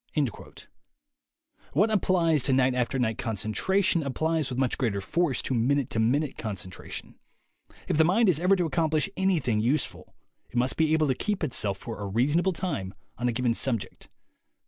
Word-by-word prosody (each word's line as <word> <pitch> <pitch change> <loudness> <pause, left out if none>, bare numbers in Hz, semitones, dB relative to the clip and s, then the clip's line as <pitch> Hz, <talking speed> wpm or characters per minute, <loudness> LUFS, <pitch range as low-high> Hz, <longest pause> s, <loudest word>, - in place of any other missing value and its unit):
.What 215 +3 +3
applies 170 -7 +2
to 135 - +2
night 130 0 +3
after 125 +1 -1
night 115 -3 -1
concentration 170 - 0
applies 155 +2 -1
with 125 - -4
much 130 -2 0
greater 110 -6 0
force 150 - 0
to - - -2
minute 130 +3 +1
to 110 - -1
minute 135 +6 +1
concentration. 95 -5 -6 0.7
If - - 0
the - - +7
mind 200 +7 +3
is 170 -5 +3
ever 185 +3 +4
to 180 -2 0
accomplish 160 +3 0
anything 165 - +1
useful, 125 +8 -1 0.3
it - - -16
must 125 +2 +1
be 160 -1 +2
able 160 -1 +3
to 135 - +2
keep 200 +8 -2
itself 105 -9 0
for 115 +3 -7
a 100 - -3
reasonable 145 - +2
time 140 - -4 0.2
on 120 0 +1
a - - +1
given 120 0 0
subject. 115 -3 -2
135 Hz, 170 wpm, -27 LUFS, 115-165 Hz, 0.7 s, the